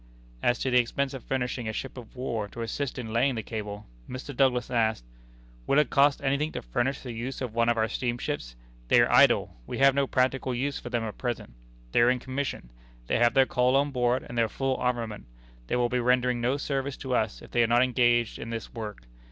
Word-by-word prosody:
As 120 Hz, -, +2 dB
to 130 Hz, -, -1 dB
the 125 Hz, -, +6 dB
expense 135 Hz, +3 st, -1 dB
of 135 Hz, -, -7 dB
furnishing 125 Hz, -2 st, -2 dB
a -, -, -3 dB
ship 135 Hz, -, -5 dB
of 125 Hz, -2 st, -11 dB
war 115 Hz, -5 st, -3 dB
to 115 Hz, +3 st, -6 dB
assist 135 Hz, +4 st, -3 dB
in 115 Hz, -3 st, -5 dB
laying 125 Hz, +3 st, +2 dB
the 110 Hz, -, -3 dB
cable, 105 Hz, -2 st, -6 dB, 0.2 s
Mr. 130 Hz, +2 st, -7 dB
Douglas 125 Hz, -2 st, +2 dB
asked: 110 Hz, -, +1 dB, 0.6 s
"Will 140 Hz, -, +3 dB
it 150 Hz, -, +3 dB
cost 140 Hz, 0 st, +4 dB
anything 140 Hz, +3 st, +1 dB
to -, -, -5 dB
furnish 120 Hz, -, -1 dB
the 125 Hz, -, -6 dB
use 120 Hz, +3 st, -5 dB
of 125 Hz, -4 st, -4 dB
one 115 Hz, 0 st, +2 dB
of 120 Hz, -, +2 dB
our 110 Hz, 0 st, +2 dB
steamships? 120 Hz, -, -3 dB, 0.3 s
They -, -, +5 dB
are -, -, +4 dB
idle. -, -, +5 dB
We -, -, -4 dB
have 135 Hz, 0 st, +6 dB
no 140 Hz, 0 st, +1 dB
practical 130 Hz, 0 st, 0 dB
use 140 Hz, +3 st, -2 dB
for -, -, -8 dB
them 120 Hz, -2 st, -1 dB
at 110 Hz, -2 st, -6 dB
present. 120 Hz, -, -4 dB, 0.4 s
They -, -, +4 dB
are 120 Hz, -, +6 dB
in 125 Hz, -, +2 dB
commission. 130 Hz, -, -4 dB, 0.3 s
They -, -, 0 dB
have 120 Hz, +1 st, +4 dB
their 135 Hz, -1 st, +6 dB
coal 125 Hz, 0 st, +2 dB
on 140 Hz, +1 st, +2 dB
board, 125 Hz, -1 st, +1 dB
and 120 Hz, -, -8 dB
their 115 Hz, -2 st, +2 dB
full 135 Hz, -1 st, -1 dB
armament. 120 Hz, -4 st, -2 dB, 0.4 s
They -, -, 0 dB
will 120 Hz, -1 st, +2 dB
be 125 Hz, +1 st, 0 dB
rendering 125 Hz, 0 st, +2 dB
no 125 Hz, +4 st, +1 dB
service 140 Hz, -1 st, -2 dB
to 130 Hz, -1 st, -4 dB
us 110 Hz, -3 st, -1 dB
if -, -, -13 dB
they 120 Hz, -, +3 dB
are 115 Hz, -, +4 dB
not 120 Hz, +2 st, +4 dB
engaged 120 Hz, -2 st, +2 dB
in 115 Hz, -, -6 dB
this 115 Hz, -1 st, -6 dB
work. 105 Hz, -, -6 dB
125 Hz, 230 wpm, -27 LUFS, 115-135 Hz, 0.6 s, the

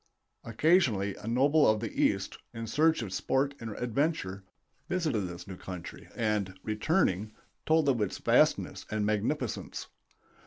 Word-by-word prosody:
Occasionally 115 Hz, -, +2 dB
a -, -, -9 dB
noble 140 Hz, +5 st, +4 dB
of 110 Hz, 0 st, +2 dB
the 110 Hz, -1 st, -4 dB
East, -, -, 0 dB, 0.2 s
in 115 Hz, 0 st, -4 dB
search 155 Hz, +4 st, +2 dB
of 95 Hz, -4 st, -6 dB
sport 135 Hz, +7 st, 0 dB
and 115 Hz, -, -6 dB
adventure, 120 Hz, -, -1 dB, 0.5 s
visited 155 Hz, -, 0 dB
this 90 Hz, 0 st, -9 dB
new 95 Hz, -2 st, -7 dB
country 90 Hz, -2 st, -8 dB
and, 105 Hz, -4 st, -1 dB
returning, 110 Hz, -, 0 dB, 0.3 s
told 160 Hz, -2 st, +4 dB
of 125 Hz, -5 st, +2 dB
its 100 Hz, -, -1 dB
vastness -, -, +2 dB
and 105 Hz, -1 st, -1 dB
magnificence. 110 Hz, +4 st, -2 dB
115 Hz, 140 wpm, -30 LUFS, 100-145 Hz, 0.5 s, noble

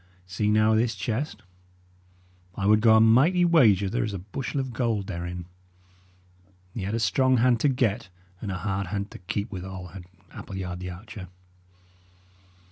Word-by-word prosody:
See, 95 Hz, +4 st, -1 dB
now, 110 Hz, +1 st, +4 dB
this 115 Hz, +1 st, +1 dB
chest. 115 Hz, +9 st, -3 dB, 1.1 s
I 95 Hz, -, -3 dB
would 105 Hz, +1 st, +5 dB
go 110 Hz, -1 st, +6 dB
a -, -, +6 dB
mighty 135 Hz, +12 st, +5 dB
wager 110 Hz, -, +4 dB
there 120 Hz, +6 st, -1 dB
is 105 Hz, -3 st, -3 dB
a -, -, -2 dB
bushel 110 Hz, +9 st, -4 dB
of 130 Hz, -2 st, -4 dB
gold 115 Hz, -5 st, -1 dB
therein. 85 Hz, -2 st, -5 dB, 1.3 s
He 115 Hz, -, -5 dB
had 100 Hz, +4 st, -2 dB
a -, -, -1 dB
strong 130 Hz, +5 st, +2 dB
hand 120 Hz, 0 st, +3 dB
to 145 Hz, -, +3 dB
get, 115 Hz, -5 st, 0 dB, 0.3 s
and 100 Hz, -, -4 dB
a 95 Hz, -, -3 dB
hard 95 Hz, +1 st, -2 dB
hand 100 Hz, +2 st, -4 dB
to -, -, -10 dB
keep 105 Hz, +4 st, -4 dB
withal, 95 Hz, -1 st, -7 dB
had 90 Hz, 0 st, -10 dB, 0.3 s
Appleyard 95 Hz, -2 st, -6 dB
the 90 Hz, 0 st, -5 dB
archer. 100 Hz, +2 st, -9 dB
105 Hz, 165 wpm, -26 LUFS, 95-120 Hz, 1.3 s, go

